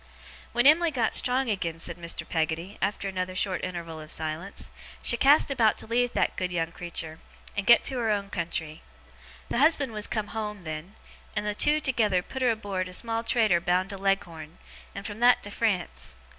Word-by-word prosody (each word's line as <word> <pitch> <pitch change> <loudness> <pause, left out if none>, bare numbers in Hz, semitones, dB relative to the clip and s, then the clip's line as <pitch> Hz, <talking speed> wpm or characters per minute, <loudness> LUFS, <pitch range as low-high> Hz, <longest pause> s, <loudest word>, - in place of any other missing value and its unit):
'When 240 +1 +1
Em'ly 330 +4 +6
got 245 -7 0
strong 255 +1 +5
again,' 170 -5 -2
said 165 - -4
Mr. 170 -1 -3
Peggotty, 165 +4 -2
after 205 -1 -1
another 185 -1 -3
short 190 -1 -1
interval 170 -3 -5
of 155 0 -9
silence, 160 +5 -3 0.3
'she - - +2
cast 280 +3 +5
about 230 -5 +3
to - - -6
leave 240 +2 +1
that - - +1
good 180 -1 -2
young 165 -1 -1
creetur, 165 -2 -5 0.4
and 200 -1 -3
get 235 - +7
to 260 -2 0
her 230 -2 0
own 200 -1 -1
country. 165 -2 -4 0.7
The - - 0
husband 290 -3 +4
was 210 -1 -1
come 215 -3 -3
home, 210 -3 -5
then; 155 +5 -7 0.4
and - - -1
the 210 - -1
two 295 +8 +4
together 215 -10 +1
put 265 - -7
her 250 - +3
aboard 200 -5 -2
a - - -9
small 230 +3 -2
trader 220 -8 +2
bound 180 +3 +1
to 195 - -6
Leghorn, 170 -5 -2 0.4
and 200 - -6
from 210 0 -6
that 245 +1 +5
to 205 - -7
France. 200 -6 -2
200 Hz, 195 wpm, -27 LUFS, 175-235 Hz, 0.7 s, get